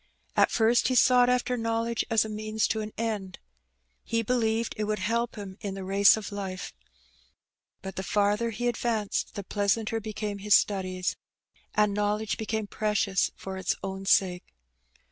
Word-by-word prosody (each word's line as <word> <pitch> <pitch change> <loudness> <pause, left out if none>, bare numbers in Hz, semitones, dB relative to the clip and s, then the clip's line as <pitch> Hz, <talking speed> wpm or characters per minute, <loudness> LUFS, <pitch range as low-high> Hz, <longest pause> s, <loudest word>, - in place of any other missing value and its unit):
At - - +5
first 235 +1 +3
he 255 - +1
sought 250 0 +5
after 250 0 +1
knowledge 230 0 -1
as 225 -1 +3
a - - -4
means 215 0 -1
to 220 - 0
an 215 0 -5
end. 210 -5 -3 0.7
He 230 0 -1
believed 230 -1 0
that - - -4
it - - +1
would 210 0 -1
help 230 +4 -1
him 200 -2 -8
in 200 -2 -4
the 195 - -6
race 195 +3 +5
of 215 0 -6
life. 195 -2 -5 1.1
But 190 0 -7
the - - -1
farther 205 +3 +1
he 240 +2 -2
advanced 225 -3 -1
the 200 - -4
pleasanter 210 +3 0
became 210 -1 -4
his 205 0 +4
studies, 185 -2 0 0.6
and 210 -1 +3
knowledge 210 +2 -1
became 220 0 -2
precious 210 -2 0
for 190 0 -7
its 185 -1 0
own 190 0 -5
sake. 180 - +2
210 Hz, 165 wpm, -28 LUFS, 200-225 Hz, 1.1 s, At